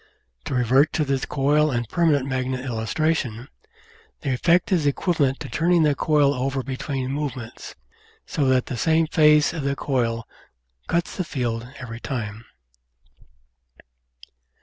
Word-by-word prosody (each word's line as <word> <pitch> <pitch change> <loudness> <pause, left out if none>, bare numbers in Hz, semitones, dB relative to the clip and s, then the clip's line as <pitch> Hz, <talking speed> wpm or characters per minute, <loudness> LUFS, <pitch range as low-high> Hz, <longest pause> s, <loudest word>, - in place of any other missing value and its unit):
To - - -3
revert 130 +4 +3
to 155 - +1
the 135 -1 0
coil 150 +2 +2
and 120 -4 -2
permanent 155 -4 +2
magnet 130 -1 -2
illustration, 125 +1 -1 0.7
the 135 - -1
effect 170 +9 +2
is 165 -6 +2
equivalent 140 -2 +1
to - - -5
turning 170 +1 +2
the 150 -1 +3
coil 145 0 +2
over 135 +1 -2
be 130 0 -4
tween 135 -1 -3
movements, 135 -5 -5 0.5
so 145 - -1
that 130 -1 +3
the 125 - -5
same 160 +6 +3
face 150 -1 +4
of 165 - -4
the 140 0 -1
coil 115 -5 -1 0.6
cuts 170 0 -1
the 185 - 0
field 120 -6 -3
every 115 -2 -7
time. 115 -4 -5
135 Hz, 140 wpm, -23 LUFS, 125-150 Hz, 0.7 s, face